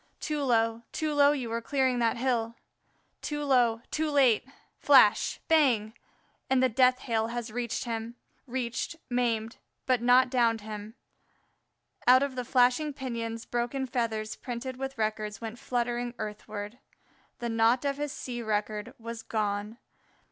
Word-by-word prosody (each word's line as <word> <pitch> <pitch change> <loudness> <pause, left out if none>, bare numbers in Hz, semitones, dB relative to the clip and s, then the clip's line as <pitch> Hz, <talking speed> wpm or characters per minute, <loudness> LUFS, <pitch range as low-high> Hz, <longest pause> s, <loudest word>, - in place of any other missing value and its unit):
Too 300 -1 -2
low, 230 -3 +1
too 310 -1 -2
low 285 0 +5
you 255 -6 -3
are 230 0 -1
clearing 260 0 +1
that 235 +1 +1
hill. 235 -2 0 0.7
Too 295 0 -3
low 240 -4 +3
too 315 0 0
late! 270 -6 +4 0.4
Flash 260 -7 +5
bang! 250 -10 +3 0.6
and 260 -1 +3
the 260 - +4
death 255 +2 +3
hail 225 -2 0
has 235 -1 -5
reached 240 +2 -2
him; 230 -1 -4 0.3
reached, 250 +4 -3 0.2
maimed, 230 -2 0 0.3
but 255 -3 +2
not 250 +1 +5
downed 230 -3 +2
him. 210 +1 -8 1.1
Out 255 +2 +7
of 280 -1 -2
the 250 - -2
flashing 255 +5 +3
pinions 230 -4 -5
broken 245 +3 -2
feathers 225 -3 -2
printed 250 +1 -6
with 270 0 -5
records 215 -1 -2
went 230 +1 -7
fluttering 245 -2 -2
earthward. 210 +1 -6 0.6
The 240 -1 -4
"naught" 230 +4 +3
of 280 -1 0
his 295 -1 -3
sea 240 -3 -5
record 215 +2 -2
was 230 0 -7
gone. 210 0 -2
240 Hz, 145 wpm, -29 LUFS, 225-260 Hz, 1.1 s, Out